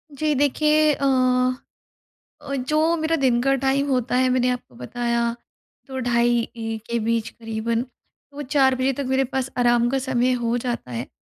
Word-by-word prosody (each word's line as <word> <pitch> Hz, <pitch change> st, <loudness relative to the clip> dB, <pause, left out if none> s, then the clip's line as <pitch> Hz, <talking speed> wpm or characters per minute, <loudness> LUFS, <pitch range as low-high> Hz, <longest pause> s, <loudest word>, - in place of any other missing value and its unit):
जी, 305 Hz, +2 st, 0 dB
देखिए 300 Hz, +2 st, +3 dB
अ 280 Hz, -, -2 dB, 1.4 s
अ, 275 Hz, -, -6 dB
जो 305 Hz, +5 st, +1 dB
मेरा 320 Hz, +1 st, 0 dB
दिन 255 Hz, -5 st, +2 dB
का 270 Hz, +2 st, +2 dB
टाइम 270 Hz, +1 st, 0 dB
होता 250 Hz, -2 st, 0 dB
है, 255 Hz, 0 st, +3 dB
मैंने 250 Hz, 0 st, +2 dB
आपको 245 Hz, -, -5 dB
बताया, 235 Hz, -, -1 dB, 0.5 s
तो 265 Hz, -1 st, -5 dB
ढाई 240 Hz, -1 st, +2 dB, 0.2 s
1 225 Hz, -1 st, -5 dB
के 235 Hz, -, +1 dB
बीच 230 Hz, 0 st, -1 dB
करीबन, 230 Hz, +1 st, -3 dB, 0.5 s
वो 290 Hz, -, -6 dB
4 265 Hz, -1 st, +3 dB
बजे 260 Hz, +1 st, 0 dB
तक 280 Hz, -, -2 dB
मेरे 265 Hz, +1 st, +2 dB
पास 265 Hz, 0 st, -3 dB
आराम 240 Hz, -1 st, +3 dB
का 270 Hz, +2 st, 0 dB
समय 255 Hz, -1 st, +1 dB
हो 235 Hz, +1 st, +1 dB
जाता 240 Hz, -, -4 dB
है। 120 Hz, +2 st, -4 dB
255 Hz, 170 wpm, -23 LUFS, 235-270 Hz, 1.4 s, देखिए